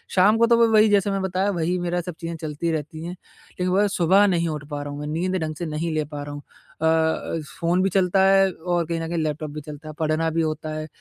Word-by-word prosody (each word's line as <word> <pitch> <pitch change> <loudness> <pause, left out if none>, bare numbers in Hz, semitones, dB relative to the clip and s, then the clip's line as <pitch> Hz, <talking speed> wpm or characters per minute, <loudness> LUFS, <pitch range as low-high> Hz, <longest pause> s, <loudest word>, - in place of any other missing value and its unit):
शाम 205 +4 +5
को 230 - +5
तो 235 0 +5
वो 230 0 +5
वही 215 0 +6
जैसा 205 -1 +3
मैं 195 0 -1
बताया 190 +1 0
वही 175 +3 0
मेरा 175 0 -1
सब 175 -1 -7
चीज़ें 165 0 -5
चलती 155 +2 -2
रहती 155 +1 -4
हैं। 170 - -5
लेकिन 180 0 -8
वह 205 +2 +4
सुबह 185 +4 +5
नहीं 170 -3 +1
उठ 150 -2 -4
पा 145 -1 -4
रहा 145 - -6
हूँ, 145 - -6
मैं 150 - -5
नींद 175 +5 -1
ढंग 155 0 -3
से 170 - -4
नहीं 160 +1 -2
ले 155 - +1
पा 145 0 -7
रहा 145 0 -7
हूँ। 145 - -7 0.4
अ, 160 0 +1 0.2
फ़ोन 175 +2 +2
भी 195 - +2
चलता 190 +1 +3
है 195 0 +5
और 175 0 -1
कहीं 165 +1 -2
न 165 - -3
कहीं 170 +1 -3
लैपटॉप 150 0 -3
भी 150 +1 -6
चलता 150 +1 -10
है, 155 - -7
पढ़ना 160 +1 +1
भी 165 +1 0
होता 155 0 -2
है 155 0 -5
165 Hz, 265 wpm, -23 LUFS, 155-185 Hz, 0.4 s, वही